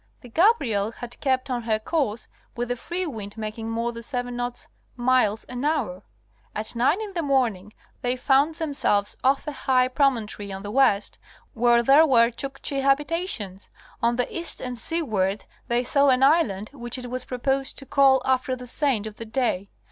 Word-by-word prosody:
The 245 - -12
Gabriel 235 - +2
had 245 0 -9
kept 260 -1 0
on 245 -1 -1
her 225 -1 0
course 230 -2 -2 0.3
with 240 0 -3
a - - +1
free 350 +9 -3
wind 215 - -7
making 220 +1 -5
more 230 +1 -1
than 230 0 -8
seven 245 0 -4
knots 245 0 -4 0.3
(miles) 240 -4 +2
an 250 +1 -6
hour. 265 - -1 0.5
At 215 +2 -4
nine 265 - +2
in 425 -2 -6
the 345 - -1
morning 240 - 0 0.3
they 245 +1 0
found 275 +4 +2
themselves 280 -10 0
off 270 +1 +2
a 300 - -3
high 260 -2 +2
promontory 235 -7 0
on 195 0 -6
the 205 - -5
west, 215 -5 +2 0.3
where 235 -1 +4
there 285 +6 +6
were 235 -3 +5
Chukchi 275 +2 -4
habita 295 +6 +1
tions. 195 - -6 0.3
On 235 +1 +2
the 250 0 +1
east 340 0 0
and 250 -1 -4
seaward 220 - -1 0.2
they 240 0 +1
saw 280 +2 +3
an 260 0 +3
island, 245 - +3
which 240 -2 -4
it 250 -1 -7
was 255 0 -2
proposed 270 +2 -2
to 275 - -7
call 270 -1 +4
after 260 0 +1
the 250 0 -9
saint 250 -4 +1
of 215 -1 -8
the 230 - -6
day. 220 -5 -1
250 Hz, 185 wpm, -24 LUFS, 225-275 Hz, 0.5 s, there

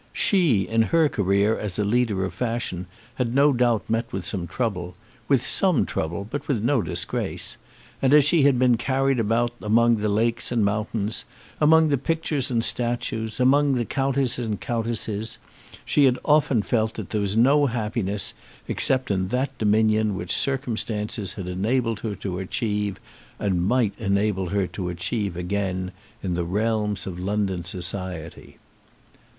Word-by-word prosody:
She, 165 - +3
in 115 0 +2
her 160 +7 +3
career 100 0 +1
as 100 -4 -4
a 105 - +1
leader 105 -3 +1
of 95 - -5
fashion, 115 -7 -3 0.3
had 125 -1 -1
no 140 +1 +5
doubt 120 -5 +1
met 115 +1 -1
with 95 -2 -4
some 90 -3 -3
trouble, 90 -7 -3 0.3
with 135 -4 +2
some 180 - +4
trouble 85 +5 -3
but 145 +6 -5
with 120 -7 -1
no 125 0 +2
disgrace; - - -2 0.4
and 135 - +3
as 150 -1 +7
she 155 +1 +4
had 140 -2 +4
been 125 -1 +3
carried 135 +1 0
about 115 +2 +1
among 115 +2 +3
the 105 0 -1
lakes 115 +4 0
and 115 -4 +2
mountains, 105 +1 -1 0.4
among 160 +1 +5
the 140 -3 +1
pictures 155 -3 -1
and 115 -3 0
statues, 120 -2 -1
among 140 +2 +4
the 120 -2 -1
counts 135 -2 0
and 110 -4 -3
countesses, 115 -2 -3 0.5
she 145 - +3
had 130 -1 +3
often 145 -7 +3
felt 110 -1 0
that 110 -5 -7
there 105 - 0
was 100 +1 -1
no 140 +5 +4
happiness 105 -5 -1 0.3
except 130 -4 +2
in 95 -1 0
that 130 +7 -2
dominion 110 -1 +2
which 90 -1 -4
circumstances 110 -6 -1
had 95 -3 -7
enabled 115 +5 -1
her 110 -3 -4
to 90 -1 -5
achieve 105 0 -2 0.4
once, 100 - 0
and 90 0 0
might 120 -3 +2
enable 100 -3 0
her 100 0 0
to 90 0 -5
achieve 90 +2 -3
again 95 0 -2 0.3
in 90 -2 -1
the 85 0 -1
realms 105 +2 -1
of 90 -2 -6
London 95 -2 -1
society. 90 -2 -3
110 Hz, 160 wpm, -24 LUFS, 100-125 Hz, 0.5 s, as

